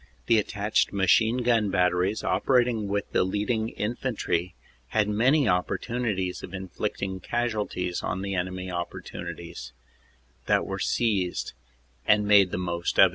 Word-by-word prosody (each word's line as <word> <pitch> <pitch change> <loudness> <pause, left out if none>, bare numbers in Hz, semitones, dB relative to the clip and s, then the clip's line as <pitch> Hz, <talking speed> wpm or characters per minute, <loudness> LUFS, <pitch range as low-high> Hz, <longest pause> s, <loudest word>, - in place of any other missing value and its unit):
The 115 -2 +4
attached 105 0 0
machine 110 +5 +3
gun 115 -4 +3
batteries 90 +2 +1
operating 120 +2 +2
with 100 0 -2
the - - +3
leading 105 +4 -1
in 110 +2 -3
fantry 90 -9 -2 0.3
had 105 - +1
many 125 +7 +3
opportunities 95 0 -1
of 95 - -7
inflicting 95 0 -4
casualties 105 -6 -2
on 95 +1 -3
the 100 0 -3
enemy 95 0 -3
opportunities 85 -5 -6 0.7
that - - +3
were - - -4
seized 100 -7 0 0.5
and 105 0 +4
made 100 -2 +6
the 90 - -3
most 85 -1 -2
of. 95 - +8
100 Hz, 130 wpm, -26 LUFS, 90-110 Hz, 0.7 s, of